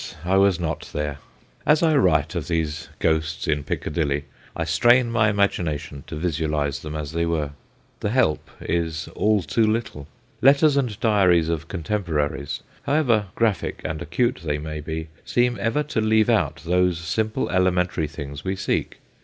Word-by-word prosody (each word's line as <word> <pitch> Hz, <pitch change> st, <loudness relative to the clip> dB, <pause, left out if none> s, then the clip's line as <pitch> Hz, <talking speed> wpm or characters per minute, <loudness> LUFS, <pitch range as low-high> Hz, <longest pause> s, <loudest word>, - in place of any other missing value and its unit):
I 95 Hz, +2 st, +2 dB
was 95 Hz, -3 st, +4 dB
not 85 Hz, -3 st, -3 dB
there. 75 Hz, -1 st, -3 dB, 0.4 s
As 150 Hz, +2 st, +3 dB
I 160 Hz, -2 st, +4 dB
write 140 Hz, -, +3 dB
of -, -, -3 dB
these 80 Hz, -1 st, -2 dB
ghosts 80 Hz, -1 st, 0 dB
in 75 Hz, -1 st, 0 dB
Piccadilly 75 Hz, -1 st, -2 dB, 0.3 s
I 80 Hz, -, -1 dB
strain 120 Hz, +10 st, +4 dB
my 110 Hz, -2 st, +3 dB
imagination 85 Hz, -8 st, -1 dB
to -, -, -6 dB
visualise 75 Hz, -3 st, -1 dB
them 75 Hz, +1 st, -7 dB
as 75 Hz, -1 st, -4 dB
they 85 Hz, +1 st, 0 dB
were. 75 Hz, -4 st, -1 dB, 0.5 s
The -, -, -1 dB
help 110 Hz, -10 st, +1 dB
is 80 Hz, -1 st, -2 dB
all 105 Hz, -2 st, +1 dB
too 110 Hz, +9 st, +1 dB
little. 110 Hz, -10 st, -2 dB, 0.3 s
Letters 140 Hz, +2 st, +5 dB
and 125 Hz, -7 st, 0 dB
diaries 90 Hz, -7 st, +3 dB
of 80 Hz, -1 st, -2 dB
contemporaries, 80 Hz, -6 st, -2 dB, 0.2 s
however 125 Hz, -8 st, +2 dB
graphic 115 Hz, -4 st, 0 dB
and 80 Hz, 0 st, -3 dB
acute 85 Hz, +9 st, 0 dB
they 75 Hz, -2 st, -1 dB
may 75 Hz, 0 st, -5 dB
be, 80 Hz, +1 st, -5 dB
seem 120 Hz, 0 st, +1 dB
ever 115 Hz, +8 st, +1 dB
to 145 Hz, -7 st, -2 dB
leave 110 Hz, +1 st, +3 dB
out 80 Hz, -10 st, 0 dB
those 90 Hz, 0 st, +2 dB
simple, 110 Hz, +6 st, -1 dB
elementary 90 Hz, -3 st, +1 dB
things 70 Hz, -1 st, -7 dB
we 95 Hz, +1 st, -1 dB
seek. 95 Hz, -, -2 dB
85 Hz, 160 wpm, -23 LUFS, 75-110 Hz, 0.5 s, Letters